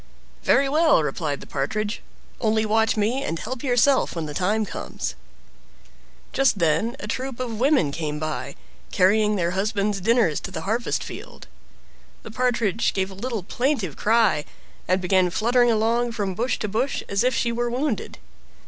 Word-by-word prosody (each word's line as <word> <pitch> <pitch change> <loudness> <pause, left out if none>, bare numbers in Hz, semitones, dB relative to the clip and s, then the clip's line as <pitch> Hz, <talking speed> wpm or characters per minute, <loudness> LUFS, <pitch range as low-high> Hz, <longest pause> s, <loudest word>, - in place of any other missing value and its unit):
"Very 275 0 +3
well!" 305 - +4
replied 145 0 -2
the - - -10
Partridge; 210 +10 -2 0.4
"only 220 -1 +1
watch 220 +1 +2
me, 225 +6 +1
and 165 - -2
help 250 +8 -5
yourself 260 -1 +2
when 165 -2 -3
the 150 - -6
time 210 +7 +1
comes." - - -5 1.2
Just 270 -5 +3
then 170 +8 +1
a - - -6
troop 260 -1 -4
of 235 -4 -4
women 265 - +3
came 150 0 -3
by, 155 0 -4 0.4
carrying 210 +3 +3
their 170 -3 0
husbands 200 +1 -1
dinners 225 -6 +2
to - - -7
the 160 - -5
harvest 225 +6 -1
field. - - -9 0.8
The - - -9
Partridge 230 -3 0
gave 190 0 -1
a - - -8
little 220 0 -4
plaintive 235 - -1
cry, 215 -9 +3 0.4
and 185 +1 +2
began 185 0 +3
fluttering 240 +6 +3
along 230 +2 +1
from 200 -4 -2
bush 240 +7 -1
to 210 - -3
bush 235 +7 -1
as 200 +2 0
if 255 -1 +2
she 235 - +1
were 240 +1 -1
wounded. 250 -1 -2
215 Hz, 165 wpm, -24 LUFS, 185-240 Hz, 1.2 s, well